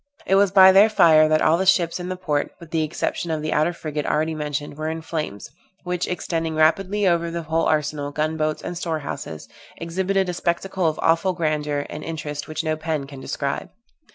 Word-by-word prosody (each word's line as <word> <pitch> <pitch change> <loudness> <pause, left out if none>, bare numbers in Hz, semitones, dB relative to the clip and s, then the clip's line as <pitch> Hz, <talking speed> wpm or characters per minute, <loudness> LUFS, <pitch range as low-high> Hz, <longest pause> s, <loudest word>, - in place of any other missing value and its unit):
It - - 0
was 195 0 +5
by 190 0 +8
their 200 +3 +6
fire 155 -7 +6
that 155 0 +2
all 165 +2 +4
the 190 - 0
ships 175 -2 +3
in 180 0 -5
the 185 - -2
port 150 -6 -2
(with 170 -2 -13
the 160 - +1
exception 155 +2 -2
of 155 -1 -2
the 155 - -1
outer 155 +3 +2
frigate 155 -3 -4
already 155 +1 0
mentioned) 150 -1 -4
were 155 +1 -3
in 160 0 -5
flames, 155 -11 -5 0.3
which, 180 -1 -2
extending 165 -2 -2
rapidly 190 +6 +2
over 170 -1 +2
the 170 0 -4
whole 160 +1 0
arsenal, 150 -2 -1
gun 155 +2 -1
boats, 155 -1 -2
and 175 - -5
storehouses, 155 - -5 0.3
exhibited 190 +3 -1
a 180 - -2
spectacle 175 +1 -1
of 155 - -1
awful 165 +3 +2
grandeur 150 -4 -1
and 150 - -7
interest 150 -3 -5
which 155 +1 -4
no 155 -1 0
pen 155 -2 -3
can 140 -1 -11
describe. - - -3
160 Hz, 205 wpm, -22 LUFS, 155-175 Hz, 0.3 s, by